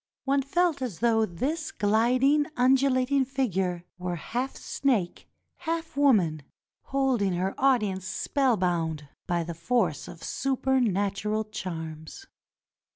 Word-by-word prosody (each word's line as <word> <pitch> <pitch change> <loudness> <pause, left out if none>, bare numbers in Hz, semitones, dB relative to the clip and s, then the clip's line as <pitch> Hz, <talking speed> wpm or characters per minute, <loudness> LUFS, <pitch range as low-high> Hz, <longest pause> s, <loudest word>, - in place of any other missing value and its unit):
One 275 +1 +2
felt 320 +2 +1
as 240 -10 -3
though 225 -2 +2
this 300 - -3
gliding, 250 +8 +3
undulating 265 +1 +3
figure 195 -10 -1
were 180 -1 -2
half 245 - -3
snake, 230 -11 -1 0.3
half 325 -1 -4
woman, 205 - +3 0.4
holding 260 -8 +1
her 185 +2 -1
audience 210 -9 +2
spellbound 180 - 0 0.2
by 175 -1 0
the 170 +1 -5
force 170 -1 0
of 165 - -11
super 265 0 0
natural 205 0 0
charms. 165 - -7
225 Hz, 110 wpm, -27 LUFS, 180-270 Hz, 0.4 s, gliding